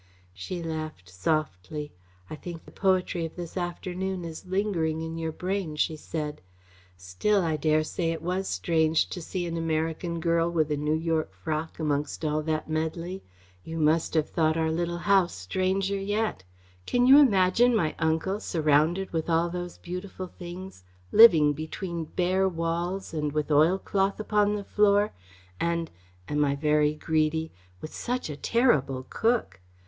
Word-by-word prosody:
She 135 - -5
laughed 155 - -5
softly. 145 - -2 0.3
"I - - -6
think 165 +1 -8
the - - -14
poetry 185 -3 +1
of 165 - -5
this 175 -2 -7
afternoon 180 +1 -3
is 165 +2 -8
lingering 175 -5 0
in 160 0 -5
your 160 -1 -2
brain," 180 -1 -3
she 155 +1 0
said. 150 -1 -5 0.6
"Still, 90 - 0
I 160 -2 0
dare 155 +1 +2
say 165 +1 -2
it 165 -1 -5
was 185 +2 -1
strange 160 - +1
to 180 - -5
see 175 +2 -3
an 170 -1 -3
American 165 +1 -1
girl 165 0 +2
with 160 -3 0
a - - +2
New 150 +1 0
York 160 -1 -1
frock 160 +1 -4
amongst 150 0 -2
all 155 0 +1
that 155 0 -2
medley. 165 +4 -3 0.4
You 165 0 -6
must 160 +1 +2
have 155 -2 +2
thought 160 -1 +1
our 160 0 +1
little 170 +1 -1
house 190 -1 +3
stranger 190 - -1
yet. 205 - -1 0.4
Can 245 0 +3
you 270 +3 +9
imagine 230 -1 +4
my 160 -8 +1
uncle, 160 +5 0
surrounded 160 +2 +1
with 160 0 -1
all 165 +1 +2
those 175 0 -5
beautiful 180 +1 -6
things, 180 - -9 0.3
living 160 -10 +8
between 165 +2 -5
bare 185 +4 +1
walls 170 +2 -3
and 150 -2 -1
with 150 0 -1
oil 155 +6 +5
cloth 195 +1 0
upon 210 -1 +2
the 205 - -4
floor, 205 +1 +3 0.5
and 170 -1 -1 0.4
am 150 0 +1
I 140 -1 +1
very 150 0 +2
greedy 160 0 0 0.3
with 155 - -8
such 245 -9 -3
a - - -5
terrible 140 - +1
cook? 225 - 0
165 Hz, 160 wpm, -27 LUFS, 155-185 Hz, 0.6 s, you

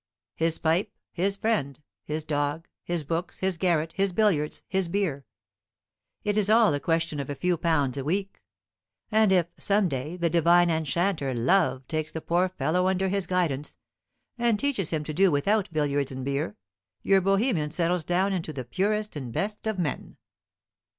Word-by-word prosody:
His 165 0 0
pipe, 165 +4 +1 0.2
his 195 +3 0
friend, 155 - -1 0.2
his 155 +1 -3
dog, 145 +2 -2 0.2
his 175 -2 -2
books, 165 +4 -3
his 190 -3 0
garret, 165 -3 +1
his 195 0 0
billiards, 175 -7 +1
his 190 -3 0
beer. 165 -8 -1 1.0
It 210 0 0
is 210 -1 +2
all 220 -5 +5
a 145 - 0
question 165 -1 -1
of 140 - -4
a 145 - -3
few 180 +4 +1
pounds 145 -5 0
a - - -3
week. 195 +6 -2 0.7
And 215 -2 +4
if, 180 -3 +4
some 200 -1 +3
day, 145 +3 -4
the 170 -1 +1
divine 170 +1 +4
enchanter 160 -2 0
Love 130 0 +2
takes 155 -1 -2
the 160 - -4
poor 175 +3 +1
fellow 180 0 0
under 190 0 +1
his 195 -1 -1
guidance, 160 -6 -1 0.6
and 235 -3 +2
teaches 250 - 0
him 155 -2 -1
to 155 - -5
do 190 +4 +4
without 190 +8 +1
billiards 145 -3 0
and 130 -1 -5
beer, 140 -7 -2 0.5
your 195 -1 +4
Bohemian 195 - +1
settles 170 +2 0
down 185 +4 +1
into 165 -4 -3
the 130 -4 -6
purest 210 - -1
and 130 -5 -5
best 210 - -3
of 220 -2 -1
men. 165 -6 -3
170 Hz, 170 wpm, -26 LUFS, 150-195 Hz, 1.0 s, all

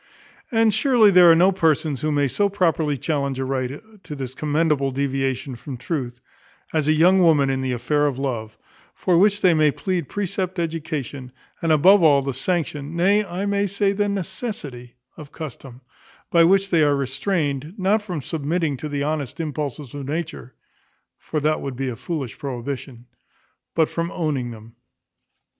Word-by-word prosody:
And 225 -2 +3
surely 225 -2 +4
there 180 -2 +8
are - - +6
no 180 +4 +5
persons 160 -6 +1
who 155 - 0
may 145 -1 +2
so 200 +9 +1
properly 165 -7 +1
challenge 140 -1 -2
a 130 - -2
right 135 - -5
to 150 - -7
this 130 -2 -6
commendable 150 -1 +1
deviation 135 -1 -2
from 130 +2 -8
truth, 125 -3 -4 0.5
as 155 -2 +1
young 170 +5 +5
women 150 -6 +4
in 130 0 -1
the 130 -1 -1
affair 145 +5 +1
of 135 -3 -2
love; 120 -5 -4 0.4
for 180 - +1
which 205 +1 +3
they 180 -2 +5
may 155 -1 +4
plead 180 +4 -2
precept, 190 -2 -3
education, 155 -6 -4 0.3
and 165 - +1
above 180 +6 +6
all, 145 -4 +5
the 135 0 -2
sanction, 150 +1 -2
nay, 200 +5 +3
I 190 0 -4
may 200 0 +1
say 200 +1 +1
the 205 0 0
necessity 190 - -5 0.2
of 150 -3 -11
custom, 135 -4 -9 0.5
by 170 -1 +6
which 195 +2 +3
they 165 -3 +4
are 145 -1 +4
restrained, 145 +2 -2
not 200 +3 +2
from 180 -9 -5
submitting 155 -1 -1
to 150 - -6
the 140 -1 -2
honest 145 -1 -3
impulses 150 -4 -4
of 140 -2 -6
nature 155 -4 -5 0.6
(for 155 - -3
that 155 +1 +1
would 135 -2 -5
be 135 +1 -2
a 120 - -5
foolish 140 -4 -5
prohibition), 130 -2 -6 0.7
but 160 -2 +3
from 170 0 -3
owning 145 -7 -2
them. 115 0 -11
155 Hz, 170 wpm, -22 LUFS, 135-180 Hz, 0.7 s, there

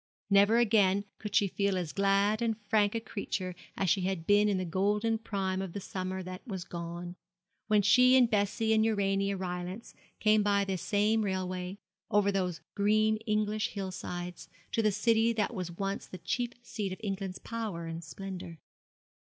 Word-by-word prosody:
Never 200 +3 +6
again 205 -4 +3
could 210 -1 -5
she 205 -2 +5
feel 200 0 0
as 170 -5 -3
glad 200 +4 +2
and 225 -2 0
frank 210 0 +1
a - - +1
creature 200 -4 -4 0.2
as 195 - 0
she 190 +2 +3
had 185 -3 -2
been 205 +2 +4
in 200 - +1
the 185 - -2
golden 210 +6 +1
prime 190 -4 -2
of 190 -3 -5
the 200 - -4
summer 185 0 -4
that 185 +1 -7
was 190 -5 -4
gone, 175 0 -6 0.5
when 210 -1 +4
she 250 +5 +6
and 250 -2 +6
Bessie 220 +1 +1
and 220 0 +4
Urania 200 -2 +1
Rylance 180 +3 -5 0.3
came 215 0 +4
by 200 -1 +2
this 190 -2 -2
same 210 +2 +2
railway, 185 -1 -3 0.3
over 200 0 +3
those 180 -4 -1
green 215 +1 +3
English 215 0 +1
hill 195 -2 -4
sides, 180 -1 -6 0.2
to 225 - +1
the 215 -1 +3
city 225 +2 +3
that 215 -2 0
was 180 -2 -4
once 195 +3 -3
the 185 - -8
chief 240 +7 -2
seat 210 -5 -4
of 185 - -6
England's 195 -2 -3
power 215 -8 -5
and 165 +1 -6
splendour. 180 0 -7
200 Hz, 175 wpm, -30 LUFS, 185-215 Hz, 0.5 s, Never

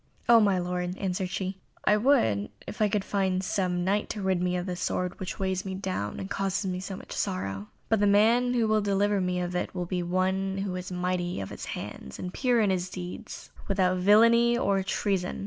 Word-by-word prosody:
"Oh, 235 -1 +8
my 200 -3 +3
lord," 180 0 -2
answered 185 -1 -2
she, 190 0 -3 0.3
"I 210 - +5
would 205 - +2 0.3
I 215 -1 +3
could 200 -1 -1
find 190 -2 0
some 180 -1 0
Knight 200 +3 0
to 210 - -4
rid 190 -2 +1
me 180 0 0
of 175 - -3
this 180 -2 -4
sword, 180 0 -2
which 185 - -5
weighs 190 -1 -1
me 190 -1 -4
down 185 - -3
and 190 - -4
causes 195 0 -1
me 185 -1 -2 0.2
much - - -12
sorrow. 105 - -3 0.2
But 225 - +2
the 205 - +3
man 230 +5 +4
who 230 -2 +2
will 215 0 +3
deliver 200 0 +1
me 180 0 0
of 180 0 -3
it 180 - -2
must 175 -1 -3
be 180 -1 0
one 190 +2 0
who 195 -1 -2
is 180 0 -5
mighty 180 - -1
of 95 - -5
his - - -7
hands, 65 - -7
and 180 0 -6
pure 250 -3 +2
in 205 -3 +3
his 185 -1 -1
deeds, 180 -1 -8 0.2
without 185 -2 +2
villainy, 230 +5 +5
or 200 -5 +1
treason. 190 -1 -1
190 Hz, 210 wpm, -28 LUFS, 180-205 Hz, 0.3 s, Oh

